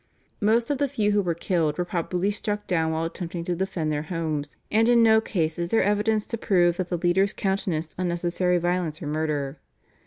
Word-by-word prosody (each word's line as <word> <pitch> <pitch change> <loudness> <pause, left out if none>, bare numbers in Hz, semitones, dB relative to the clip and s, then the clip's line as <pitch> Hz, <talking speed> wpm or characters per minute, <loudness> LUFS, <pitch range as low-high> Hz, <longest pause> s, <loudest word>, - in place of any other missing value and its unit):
Most 230 +4 +2
of 280 - -1
the 285 - +2
few 215 -6 +1
who 205 0 +3
were 175 -3 -1
killed 165 -3 0
were 180 - 0
probably 180 +3 -1
struck 210 0 -3
down 160 -3 +1
while 160 0 -1
attempting 170 0 -5
to 175 +1 -2
defend 170 -4 -2
their 150 -1 -1
homes, 155 -4 -3
and 225 +2 +4
in 235 -1 +6
no 220 -1 +6
case 165 -7 -1
is 170 0 -2
there 225 - +3
evidence 210 +1 +1
to 230 - -5
prove 175 -5 +3
that 185 -1 -2
the 175 - -1
leaders 185 +3 +2
countenanced 180 -5 -2
unnecessary 175 0 0
violence 175 -2 -1
or - - -7
murder. 150 -2 -2
180 Hz, 205 wpm, -25 LUFS, 165-205 Hz, -, in